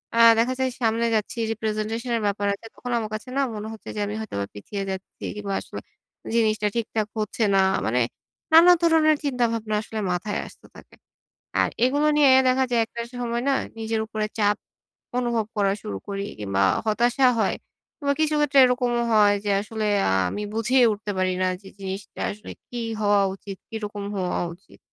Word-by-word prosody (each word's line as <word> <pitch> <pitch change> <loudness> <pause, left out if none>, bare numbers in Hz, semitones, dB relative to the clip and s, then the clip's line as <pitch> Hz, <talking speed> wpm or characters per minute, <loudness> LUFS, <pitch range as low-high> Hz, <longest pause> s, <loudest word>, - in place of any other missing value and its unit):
আ - - 0 0.2
দেখা 250 +3 +2
যায় 260 0 +1
সামনে 230 0 +2
যাচ্ছি, 215 +2 -2 0.2
representation 220 +2 -3
এর 225 - -3
ব্যাপার 205 0 -1
আছে, 200 - -9
তখন 245 - -6
আমার 220 -2 -3
কাছে 215 +4 -5
না - - +3
মনে 210 +1 -5
হচ্ছে 220 - -10
যে - - -3
আমি 205 - -4
হয়তোবা 100 - -3
পিছিয়ে 195 - -5
যাচ্ছি 190 0 -7
কিংবা 205 -2 -4
আসলে - - -8 0.5
জিনিসটা 215 -2 +2
ঠিকঠাক 220 -2 -1
হচ্ছে 215 +2 -1
না। - - +5 0.3
মানে, 120 +3 +1 0.5
নানা 335 +2 +9
ধরনের 320 -2 +4
চিন্তাভাবনা 230 -5 0
আসলে 220 0 -6
মাথায় 185 +4 -2
আসতে - - -16
থাকে - - -15 0.7
আর - - +2
এগুলো 285 +4 +2
নিয়ে 290 -2 +6 0.2
দেখা 260 +1 +3
যায় 240 -1 +3
একটা 235 - -8
সময় 240 -1 -2
না - - +4 0.3
নিজের 225 0 -1
উপরে 215 -1 -2
চাপ 205 -1 +3 0.6
অনুভব 235 -3 0
করা 200 -1 +2
শুরু 100 - -5
করি 200 0 -3
কিংবা 100 -2 0 0.2
হতাশা 240 +4 +3
হয় 215 - +2 0.4
কিংবা 280 -2 0
কিছু 310 -1 +2
ক্ষেত্রে 290 -1 +3
এরকমও 245 -1 +1
হয় 205 -2 +5
যে 205 - 0
আসলে 215 +1 -3 0.2
আ - - +2 0.2
আমি 210 - -4
বুঝেই 245 +3 +3
উঠতে 210 0 -5
পারি 185 0 +1
না - - +3
যে, 195 - -13
জিনিসটা 195 0 -6
আসলে 210 +1 -9 0.2
কি 245 - -6 0.2
হওয়া 205 -1 +4
উচিত, 195 0 -9
কিরকম 210 -2 -5
হওয়া 185 -2 -1 0.2
উচিত? 190 - -21
220 Hz, 180 wpm, -24 LUFS, 205-245 Hz, 0.7 s, নানা